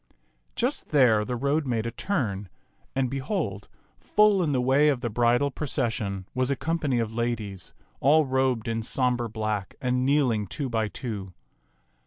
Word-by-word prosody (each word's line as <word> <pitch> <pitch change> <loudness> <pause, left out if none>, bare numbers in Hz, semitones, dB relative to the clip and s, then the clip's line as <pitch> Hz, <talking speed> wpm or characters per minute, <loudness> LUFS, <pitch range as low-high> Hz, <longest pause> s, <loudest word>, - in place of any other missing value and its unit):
Just 250 +5 -1
there 125 -8 +4
the 125 +3 -3
road 140 +4 0
made 115 -3 -1
a 115 - -2
turn, 110 - -2 0.5
and 135 -1 +1
behold, 135 - -3 0.3
full 210 -2 +4
in 160 -4 +1
the 130 - +1
way 135 +4 +4
of 135 -4 0
the 120 -3 -2
bridal 120 +5 +2
procession 110 -9 -2
was 130 0 0
a 140 - +1
company 155 -3 -1
of 115 -1 -1
ladies, 110 -5 -3 0.2
all 150 +3 +5
robed 130 -3 0
in 115 0 -1
sombre 120 0 0
black 110 -3 -3
and 125 0 0
kneeling 130 -7 +2
two 140 - -4
by 110 -2 0
two. 100 -5 -6
125 Hz, 160 wpm, -26 LUFS, 110-140 Hz, 0.5 s, all